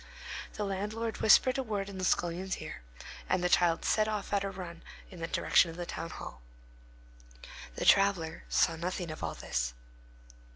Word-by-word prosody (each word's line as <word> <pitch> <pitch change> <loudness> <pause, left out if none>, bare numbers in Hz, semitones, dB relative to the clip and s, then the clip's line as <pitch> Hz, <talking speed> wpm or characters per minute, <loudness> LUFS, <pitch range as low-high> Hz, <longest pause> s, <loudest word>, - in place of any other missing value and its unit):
The 210 - -2
landlord 210 +4 -3
whispered 255 +4 +5
a - - 0
word 205 -4 -2
in 195 -2 -7
the - - -3
scullion's 180 +1 0
ear, - - -7 0.5
and 185 -1 +1
the 180 - +2
child 175 -2 +3
set 215 0 +3
off 210 -1 -3
on 200 - +3
a 195 - -2
run 180 -3 -8 0.3
in 180 - -10
the 165 - -3
direction 170 - +3
of 165 - -9
the 175 - -4
town 165 0 -5
hall. 65 - -8 1.3
The - - -3
traveller 190 -5 +4
saw 165 - +3
nothing 175 0 -3
of 155 - -8
all - - -2
this. - - -2
185 Hz, 175 wpm, -31 LUFS, 165-200 Hz, 1.3 s, whispered